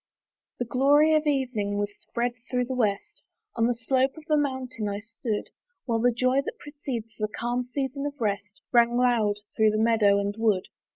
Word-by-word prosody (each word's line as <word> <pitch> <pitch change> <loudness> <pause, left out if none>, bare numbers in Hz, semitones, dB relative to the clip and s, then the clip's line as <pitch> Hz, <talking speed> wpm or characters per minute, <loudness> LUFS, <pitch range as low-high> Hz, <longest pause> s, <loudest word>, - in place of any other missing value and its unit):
The 245 - -2
glory 285 +6 +4
of 310 0 +2
evening 250 -8 0
was 205 0 -2
spread 240 +1 -2 0.2
through 250 -1 0
the 260 - -4
west; 210 -6 -1 0.3
On 230 0 +2
the 245 - +1
slope 260 +4 +1
of 315 - -10
a - - +6
mountain 260 -6 -1
I 200 - -2
stood; 225 0 -4 0.3
While 230 -3 0
the 245 +2 +4
joy 255 +3 +2
that - - -6
precedes 260 -7 -6
the 215 - 0
calm 240 +3 -2
season 275 +2 -3
of 290 0 -8
rest 205 -3 -3
Rang 240 0 +4
loud 235 -4 +3 0.2
through 220 -1 +4
the 215 - 0
meadow 215 -3 +4
and 200 0 -1
wood. 210 -5 +1
240 Hz, 185 wpm, -26 LUFS, 215-260 Hz, 0.3 s, a